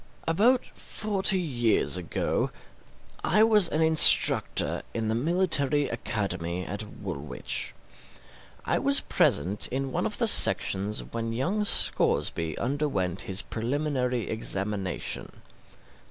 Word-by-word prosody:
About 230 Hz, +10 st, +2 dB
forty 195 Hz, -2 st, -1 dB
years 120 Hz, -, -1 dB
ago 90 Hz, -2 st, -2 dB, 0.7 s
I 215 Hz, -, +3 dB
was 210 Hz, -5 st, +4 dB
an 160 Hz, +1 st, 0 dB
instructor 160 Hz, -1 st, +5 dB
in 110 Hz, -1 st, -2 dB
the -, -, 0 dB
military 145 Hz, 0 st, +2 dB
academy 90 Hz, -6 st, -3 dB
at 100 Hz, +3 st, -5 dB, 0.2 s
Woolwich. 70 Hz, +2 st, -3 dB, 0.9 s
I -, -, 0 dB
was -, -, +3 dB
present 95 Hz, +8 st, +1 dB
in 135 Hz, +1 st, -4 dB
one -, -, -1 dB
of -, -, -5 dB
the -, -, 0 dB
sections 100 Hz, +2 st, +3 dB
when 115 Hz, 0 st, -5 dB
young 180 Hz, -, -1 dB
Scoresby 80 Hz, -, -1 dB
underwent 120 Hz, -, -2 dB
his 95 Hz, +1 st, -2 dB
preliminary 125 Hz, 0 st, -3 dB
examination. 100 Hz, -3 st, -3 dB
120 Hz, 110 wpm, -26 LUFS, 100-160 Hz, 0.9 s, instructor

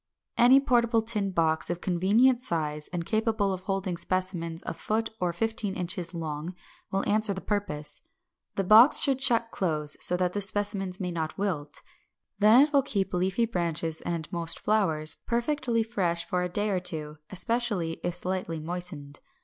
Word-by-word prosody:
Any 250 Hz, +3 st, +6 dB
portable 235 Hz, -4 st, +2 dB
tin 215 Hz, -3 st, -1 dB
box 160 Hz, -3 st, 0 dB
of 175 Hz, 0 st, -2 dB
convenient 210 Hz, +9 st, +2 dB
size, 150 Hz, -, 0 dB
and 175 Hz, -2 st, -5 dB
capable 220 Hz, -2 st, 0 dB
of 185 Hz, -, -6 dB
holding 190 Hz, -2 st, -3 dB
specimens 170 Hz, -2 st, -2 dB
a -, -, -3 dB
foot 225 Hz, +1 st, -2 dB
or 180 Hz, -1 st, 0 dB
fifteen 220 Hz, +2 st, -2 dB
inches 180 Hz, -1 st, -3 dB
long, 160 Hz, 0 st, -5 dB, 0.3 s
will 195 Hz, +1 st, -1 dB
answer 215 Hz, -1 st, +3 dB
the -, -, -4 dB
purpose. 190 Hz, -9 st, -1 dB, 0.5 s
The 195 Hz, -, 0 dB
box 220 Hz, +8 st, +7 dB
should 270 Hz, -2 st, +2 dB
shut 235 Hz, -3 st, +2 dB
close, 150 Hz, -5 st, +1 dB
so 180 Hz, -, +3 dB
that 180 Hz, 0 st, 0 dB
the 205 Hz, -, -2 dB
specimens 195 Hz, -2 st, 0 dB
may 180 Hz, -2 st, -3 dB
not 160 Hz, -2 st, -4 dB
wilt: 175 Hz, -8 st, -4 dB, 0.6 s
then 215 Hz, +5 st, +7 dB
it 300 Hz, 0 st, -2 dB
will 280 Hz, -, +5 dB
keep 200 Hz, -8 st, -2 dB
leafy 185 Hz, +5 st, +1 dB
branches 165 Hz, -6 st, -2 dB
and 170 Hz, -2 st, -4 dB
most 170 Hz, -1 st, -1 dB
flowers 160 Hz, -8 st, 0 dB
perfectly 240 Hz, -1 st, 0 dB
fresh 180 Hz, -7 st, -1 dB
for 180 Hz, -, -1 dB
a 180 Hz, -, -2 dB
day 205 Hz, +3 st, 0 dB
or 185 Hz, -, 0 dB
two, 155 Hz, -4 st, -4 dB
especially 200 Hz, -5 st, 0 dB
if 175 Hz, 0 st, -1 dB
slightly 180 Hz, -2 st, -2 dB
moistened. 160 Hz, -3 st, -6 dB
185 Hz, 165 wpm, -27 LUFS, 170-220 Hz, 0.6 s, box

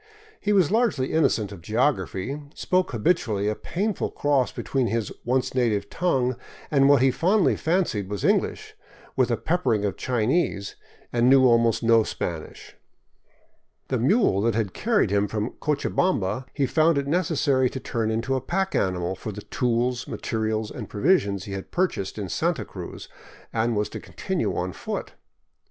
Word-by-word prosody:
He 210 Hz, -, -1 dB
was 190 Hz, -6 st, +4 dB
largely 215 Hz, -, +1 dB
innocent 115 Hz, -10 st, +2 dB
of 95 Hz, -4 st, -9 dB
geography, 130 Hz, -, -1 dB
spoke 185 Hz, 0 st, +1 dB
habitually 110 Hz, -, 0 dB
a 105 Hz, -, +1 dB
painful 195 Hz, -, -2 dB
cross 140 Hz, -3 st, +1 dB
between 130 Hz, -3 st, -1 dB
his 115 Hz, -2 st, -2 dB
once 125 Hz, +2 st, 0 dB
native 110 Hz, -6 st, 0 dB
tongue 130 Hz, -8 st, 0 dB, 0.3 s
and 140 Hz, -2 st, +4 dB
what 140 Hz, -3 st, +5 dB
he 135 Hz, -, +5 dB
fondly 190 Hz, -, +2 dB
fancied 160 Hz, -, 0 dB
was 105 Hz, -2 st, -4 dB
English, -, -, 0 dB, 0.4 s
with -, -, +2 dB
a -, -, +1 dB
peppering 105 Hz, -2 st, 0 dB
of 100 Hz, -, -2 dB
Chinese, 120 Hz, -, 0 dB, 0.4 s
and 120 Hz, +1 st, +3 dB
knew 135 Hz, -1 st, +6 dB
almost 115 Hz, -1 st, +3 dB
no 115 Hz, 0 st, +5 dB
Spanish. 85 Hz, -6 st, -5 dB, 1.1 s
The 130 Hz, -, 0 dB
mule 135 Hz, -, +3 dB
that 115 Hz, +1 st, +1 dB
had 110 Hz, -4 st, -1 dB
carried 215 Hz, -, +1 dB
him 100 Hz, 0 st, +2 dB
from 105 Hz, +3 st, -2 dB
Cochabamba 130 Hz, -, 0 dB
he 140 Hz, -, 0 dB
found 155 Hz, +3 st, +3 dB
it 140 Hz, -, 0 dB
necessary 140 Hz, -5 st, +1 dB
to 130 Hz, -, -6 dB
turn 115 Hz, -4 st, -2 dB
into 115 Hz, +4 st, -1 dB
a 130 Hz, -, 0 dB
pack 190 Hz, +7 st, -1 dB
animal 90 Hz, -1 st, 0 dB
for 105 Hz, +3 st, -6 dB
the 105 Hz, 0 st, -8 dB
tools, 125 Hz, -1 st, -1 dB
materials, 110 Hz, -1 st, -2 dB
and -, -, -7 dB
provisions 100 Hz, -, +1 dB
he 100 Hz, -, -8 dB
had 95 Hz, -1 st, -6 dB
purchased 175 Hz, -, -1 dB
in 100 Hz, -3 st, -3 dB
Santa -, -, -1 dB
Cruz, -, -, -8 dB, 0.5 s
and 115 Hz, +1 st, +1 dB
was 105 Hz, 0 st, 0 dB
to -, -, -7 dB
continue -, -, -3 dB
on 90 Hz, 0 st, -2 dB
foot. -, -, -5 dB
120 Hz, 160 wpm, -25 LUFS, 105-150 Hz, 1.1 s, knew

